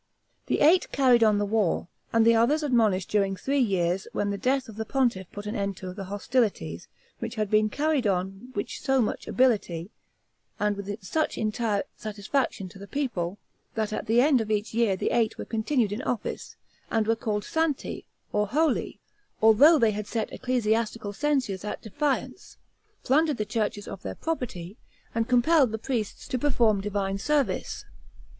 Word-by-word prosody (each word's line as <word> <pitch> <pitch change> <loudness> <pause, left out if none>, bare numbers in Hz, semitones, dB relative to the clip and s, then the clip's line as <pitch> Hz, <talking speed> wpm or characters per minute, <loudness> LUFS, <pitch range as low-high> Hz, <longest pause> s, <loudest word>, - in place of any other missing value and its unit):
The - - 0
eight 335 +5 +5
carried 250 -4 +4
on 215 -2 +4
the 205 - +1
war, 205 -5 0 0.2
and 225 0 +4
the 230 - +6
others 255 +8 +3
admonished 220 - +2
during 195 -2 +1
three 275 +8 -1
years, 190 -5 +1
when 205 0 0
the 200 - -2
death 265 +3 +1
of 220 - -10
the 220 - -3
pontiff 230 -7 0
put 205 0 -8
an 210 +3 -4
end 200 -2 -2
to 185 -1 -6
the 195 0 -6
hostilities, 200 - -1 0.3
which - - -5
had 215 -2 -2
been 215 0 +4
carried 290 -1 +1
on 195 +4 -2
which 205 - -4
so 270 0 +2
much 225 - -1
ability, 210 -8 +1 0.7
and 210 0 +1
with 200 +1 -6
such 310 - -1
entire 215 -1 0
satisfaction 215 0 -2
to 195 - -14
the 200 - -9
people, 205 -11 -2 0.4
that 215 -1 -1
at - - -4
the 230 +3 +4
end 270 -3 +4
of 220 - -4
each 215 0 -1
year 225 -4 +2
the - - -1
eight 225 -2 +1
were - - -5
continued 225 0 0
in 210 +5 -3
office, 245 -5 -4 0.3
and 225 -1 +1
were 225 +1 +2
called 210 -2 -2
Santi, 320 -3 -2 0.3
or 210 0 +1
holy, 305 +8 0 0.4
although 245 +10 +7
they 230 -6 +3
had 210 0 -4
set 225 -2 -3
ecclesiastical 225 -3 -1
censures 260 -8 0
at 210 - -5
defiance, 270 - -3 0.5
plundered 300 +1 +2
the 210 - -1
churches 210 -2 -2
of 195 - -7
their - - -5
property, 225 - -4 0.4
and 230 +1 -1
compelled 255 +1 +4
the 220 - -2
priests 225 -2 -3
to 255 -3 -1
perform 230 -7 +2
divine 195 -1 -2
service. 295 +4 -1
220 Hz, 175 wpm, -27 LUFS, 205-255 Hz, 0.7 s, although